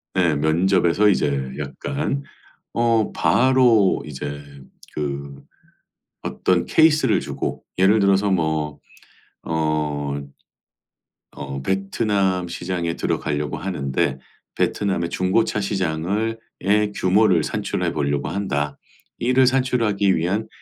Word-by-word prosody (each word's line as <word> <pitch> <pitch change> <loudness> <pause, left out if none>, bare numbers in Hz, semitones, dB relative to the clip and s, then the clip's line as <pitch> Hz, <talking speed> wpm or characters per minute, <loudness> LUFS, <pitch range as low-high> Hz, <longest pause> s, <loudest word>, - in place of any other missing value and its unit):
네. 85 -4 +3
면접에서 85 +6 +3
이제 70 -7 0
약간 140 - -3 0.5
어 115 -2 +2
바로 125 -6 +4
이제 70 0 -6 0.5
그 70 -1 -5 0.8
어떤 90 -1 0
케이스를 150 - +4
주고 - - -4
예를 100 +4 +4
들어서 100 0 +3
뭐 80 -4 -1 0.6
어, 75 -3 -1 1.1
어 70 0 -6
"베트남 95 0 0
시장에 85 -1 -3
들어가려고 75 0 -2
하는데 70 -7 -1 0.4
베트남의 95 -4 0
중고차 95 +3 +1
시장을 100 +3 -1 0.2
의 105 +1 +2
규모를 95 -3 +3
산출해 - - -2
보려고 70 -1 -1
한다. 75 -7 -2 0.4
이를 125 +2 +3
산출하기 115 -7 +2
위한 95 +7 -1
95 Hz, 220 characters per minute, -22 LUFS, 75-105 Hz, 1.1 s, 바로